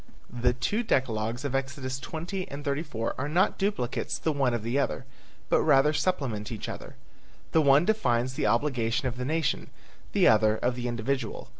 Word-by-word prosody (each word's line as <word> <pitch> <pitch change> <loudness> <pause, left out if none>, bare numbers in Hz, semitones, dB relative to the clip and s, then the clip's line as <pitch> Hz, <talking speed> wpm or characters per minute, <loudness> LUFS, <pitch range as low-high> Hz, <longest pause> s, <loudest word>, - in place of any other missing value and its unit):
The 125 0 +2
two 205 - -1
decalogues 120 - 0
of 140 - -2
Exodus 130 -1 -3
20 175 +6 -5
and 145 +2 -7
34 140 -5 -2
are 140 +2 -2
not 175 +5 +2
duplicates 195 - -1
the 160 - 0
one 140 -4 +1
of 115 - -4
the 120 +5 0
other, 130 -2 -1 0.4
but - - +3
rather 150 0 +4
supplement 130 - -1
each 110 - -5
other. - - -7 0.6
The 160 - +4
one 140 +2 +5
defines 130 - +1
the 130 - 0
obligation 120 +1 +1
of 125 0 -4
the 125 - -3
nation, 155 0 -1 0.4
the - - +5
other 110 0 +4
of 125 +2 0
the 125 0 -3
individual. 120 0 -3
130 Hz, 175 wpm, -28 LUFS, 120-150 Hz, 0.6 s, one